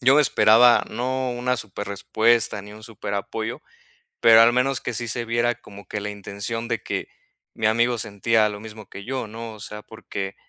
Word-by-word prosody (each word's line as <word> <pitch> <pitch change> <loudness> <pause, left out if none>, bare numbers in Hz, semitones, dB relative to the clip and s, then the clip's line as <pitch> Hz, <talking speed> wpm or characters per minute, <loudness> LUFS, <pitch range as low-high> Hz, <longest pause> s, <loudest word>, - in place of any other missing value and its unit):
Yo 130 +2 +5
me 150 - +6
esperaba, 120 -1 +5
no 130 +1 -2
una 125 +1 -1
súper 105 -2 -6
respuesta 110 +1 +1
ni 105 0 -11
un 110 - -13
súper 110 -2 -7
apoyo, 110 +3 -4 0.6
pero 115 0 +8
al 120 +1 +6
menos 130 +1 +1
que 125 - -4
sí 120 +2 -2
se 120 +1 -2
viera 120 +1 +1
como 100 -4 -14
que 105 - -4
la 105 - -4
intención 105 +3 -5
de 115 -3 -1
que - - -4 0.4
mi 110 - 0
amigo 120 +2 +2
sentía 110 +1 +1
lo 105 0 -7
mismo 110 -2 -10
que 100 +1 -9
yo, 130 -3 -3
¿no? 115 +1 -8
O - - -14
sea, 105 +1 -7
porque 100 -3 -6
115 Hz, 200 wpm, -23 LUFS, 105-120 Hz, 0.6 s, pero